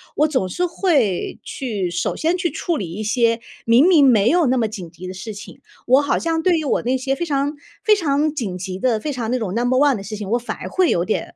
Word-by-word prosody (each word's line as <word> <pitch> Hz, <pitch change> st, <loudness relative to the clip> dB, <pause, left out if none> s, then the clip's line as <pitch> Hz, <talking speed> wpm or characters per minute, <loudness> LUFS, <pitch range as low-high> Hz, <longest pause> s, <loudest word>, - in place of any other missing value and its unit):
我 300 Hz, +1 st, +3 dB
总 260 Hz, -11 st, 0 dB
是 360 Hz, -, -1 dB
会 295 Hz, -, 0 dB
去 210 Hz, -9 st, -3 dB
首 175 Hz, 0 st, -2 dB
先 335 Hz, +3 st, 0 dB
去 345 Hz, -2 st, -1 dB
处 340 Hz, -3 st, -2 dB
理 170 Hz, -4 st, -5 dB
一 215 Hz, -, -5 dB
些， 230 Hz, +1 st, +1 dB, 0.3 s
明 240 Hz, +9 st, +5 dB
明 315 Hz, -7 st, +6 dB
没 230 Hz, -3 st, +4 dB
有 345 Hz, -2 st, +3 dB
那 255 Hz, +1 st, +2 dB
么 225 Hz, -2 st, +1 dB
紧 185 Hz, -6 st, -8 dB
急 180 Hz, +2 st, -10 dB
的 185 Hz, -, -6 dB
事 210 Hz, +4 st, -7 dB
情， 205 Hz, -, -11 dB, 0.3 s
我 260 Hz, +3 st, +5 dB
好 285 Hz, -, 0 dB
像 325 Hz, -1 st, -1 dB
对 355 Hz, -3 st, +3 dB
于 -, -, -4 dB
我 -, -, +1 dB
那 255 Hz, +2 st, +1 dB
些 270 Hz, +1 st, -1 dB
非 345 Hz, -, -3 dB
常 285 Hz, -1 st, -1 dB, 0.3 s
非 425 Hz, -1 st, +5 dB
常 300 Hz, -4 st, 0 dB
紧 200 Hz, -11 st, -4 dB
急 185 Hz, 0 st, -5 dB
的， 235 Hz, -2 st, +1 dB
非 300 Hz, -, -3 dB
常 235 Hz, -2 st, -3 dB
那 255 Hz, -, 0 dB
种 195 Hz, -4 st, -3 dB
number 245 Hz, +2 st, +1 dB
one 280 Hz, -2 st, +4 dB
的 195 Hz, -, -6 dB
事 215 Hz, +2 st, -6 dB
情， 205 Hz, -2 st, -6 dB
我 240 Hz, -, +3 dB
反 240 Hz, -, -5 dB
而 -, -, -7 dB
会 370 Hz, -2 st, +2 dB
有 175 Hz, +1 st, +1 dB
点， 215 Hz, -, -3 dB
250 Hz, 315 characters per minute, -20 LUFS, 210-305 Hz, 0.3 s, 明